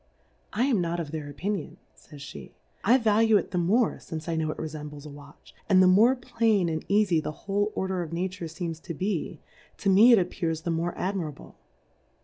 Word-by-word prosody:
I 230 - 0
am 245 -9 +2
not 170 0 -2
of 155 -4 -5
their 155 -2 -5
Opinion, 185 +3 -4 0.2
jGy^j/;^, 140 - -11 0.3
I 240 +5 +5
value 220 -2 +4
it 200 - -3
the 180 - 0
morq 210 +7 +1
fince 160 0 -7
I 165 - -1
knov^ 160 -1 -1
it - - -4
refembles 150 -2 -7
a - - -8
Watch, 145 0 -15 0.2
and 190 -2 +6
the 185 - +7
more 215 +8 +5
plain 230 -7 +1
and 160 -1 -3
eafy 200 -5 +3
the 150 - -4
whole 205 +1 0
order 190 -1 -1
of 165 -2 -6
Nature 180 +1 -3
feems 165 0 -5
to 170 - -7
be, 195 +8 -3 0.4
to 200 - +1
me 215 +6 +7
it 235 - +8
appears 170 -3 -1
the 170 - -2
more 165 +1 -2
admirable. 180 -6 -4
180 Hz, 195 wpm, -27 LUFS, 160-205 Hz, 0.4 s, it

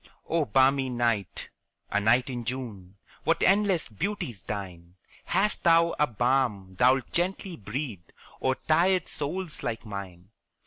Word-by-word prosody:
Oh, 165 -2 +1
balmy 135 +3 +3
night 120 -6 -1 0.4
a - - +2
night 120 +4 +3
in 125 -3 -4
June 110 -7 -6 0.3
What - - +1
endless 195 -3 +3
beauties 145 - -4
thine! 90 -4 -7 0.3
Hast 200 +4 +1
thou 170 -1 +5
a 150 - +4
balm 120 -5 0
thou'lt 130 +6 +3
gently 180 +1 -1
breathe 110 - -5 0.3
O'er 130 0 +2
tired 180 +4 +3
souls 160 +2 -3
like 115 +1 -4
mine? 100 -2 -8
130 Hz, 130 wpm, -27 LUFS, 105-165 Hz, 0.4 s, thou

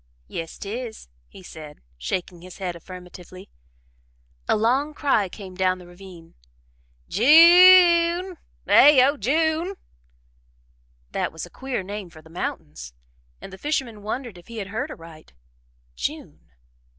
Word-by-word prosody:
"Yes 165 - -7
'tis," 220 - -7 0.2
he 185 - -15
said, 155 -4 -11 0.2
shaking 175 - -5
his 180 0 -12
head 180 -3 -4
affirmatively. 180 +1 -12 1.0
A - - +2
long 265 +7 0
cry 225 -11 +1
came 190 -1 -10
down 185 0 0
the 180 - -14
ravine: 175 -2 -14 0.7
"J 340 - +7
u - - -3
n 370 +1 -7
e! - - -12 0.4
eh 275 -3 +7
oh 285 - 0
J 305 +8 +1
u 315 +1 -3
n 350 - -4
e!" 390 - -6 1.4
That - - -2
was 160 +1 -7
a 175 - -17
queer 260 -6 -5
name 200 -1 -7
for 155 -1 -16
the 160 - -18
mountains, 70 - -6 0.4
and 195 - -11
the 190 - -11
fisherman 265 -8 -3
wondered 220 -2 -6
if 170 - -20
he 230 - -10
had 200 -2 -6
heard 220 +2 -4
aright 165 - -13 0.6
June. 60 - -6
200 Hz, 150 wpm, -23 LUFS, 175-275 Hz, 1.4 s, J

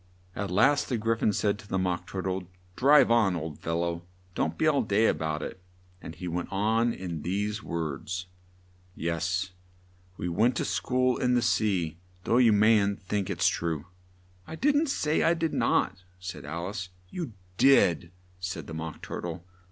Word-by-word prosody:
At 100 -1 -3
last 135 +10 +3
the 125 - 0
Gry 115 +1 +1
phon 110 - +1
said 105 0 0
to 105 - -13
the 95 - -1
Mock 90 -1 -1
Tur 95 0 -4
tle, 95 -1 -2 0.3
"Drive 140 -1 +6
on, 110 -6 +4
old 80 -2 -5
fellow! 85 +1 -2 0.3
Don't - - -1
be - - +1
all 150 -3 +4
day 105 +3 +2
a - - +4
bout 80 -1 -3
it!" 95 - -7 0.4
and 80 - -8
he 90 +3 -6
went 85 +1 -3
on 110 +4 +2
in 85 -7 -5
these 105 +5 -2
words: 85 +3 -4 0.7
"Yes, 85 +3 -1 0.7
we - - -3
went 110 +9 +2
to - - -1
school 125 0 +1
in 125 -1 +2
the 120 - +3
sea, 95 -8 +1 0.2
though 115 - +2
you 120 -3 +6
mayn't 105 -1 +3
think 100 0 -2
it's 90 -3 +2
true 80 -2 -1 0.3
" 90 0 -31
"I 160 - -6
didn't 290 - +2
say 155 - +1
I 170 - +4
did 165 -2 -1
not!" - - +1 0.2
said 90 -3 -7
Al 85 +5 -4
ice. 95 -3 -5 0.2
"You 160 - -5 0.2
did," 95 - +4 0.3
said 90 -4 -4
the 80 - -8
Mock 80 0 -6
Tur - - -5
tle. 85 0 -6
95 Hz, 185 wpm, -28 LUFS, 85-115 Hz, 0.7 s, Drive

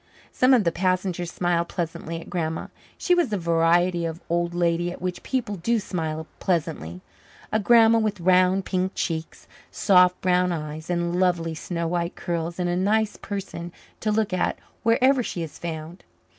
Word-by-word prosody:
Some 255 +1 +4
of 235 - +3
the 170 - +2
passengers 185 -1 -1
smiled 175 -1 0
pleasantly 165 -1 -4
at - - -11
Grandma. 160 -2 -3 0.3
She 360 - +2
was 345 -7 +2
the 210 - -1
variety 170 +1 +2
of 165 0 -3
old 175 0 0
lady 175 0 +1
at - - -9
which 180 0 -4
people 240 -6 -2
do 230 +7 +1
smile 160 -5 -3
pleasantly; 150 - -2 0.5
a 215 - +2
grandma 230 +1 +6
with 215 -3 -1
round, 185 +2 +3
pink 185 0 -1
cheeks, 160 -2 -4 0.2
soft, 180 -2 +4
brown 180 0 +2
eyes, 155 0 -5
and 175 0 0
lovely 175 -3 +1
snow 170 +1 -3
white 170 +1 -2
curls 170 -1 -3
is 180 - -4
a 175 - 0
nice 210 +4 +1
person 190 -4 -6 0.3
to 215 - 0
look 215 -2 0
at 180 - 0 0.2
wherever 250 +3 +4
she 175 -7 -4
is 160 - -9
found. 165 +1 -6
175 Hz, 170 wpm, -24 LUFS, 170-195 Hz, 0.5 s, grandma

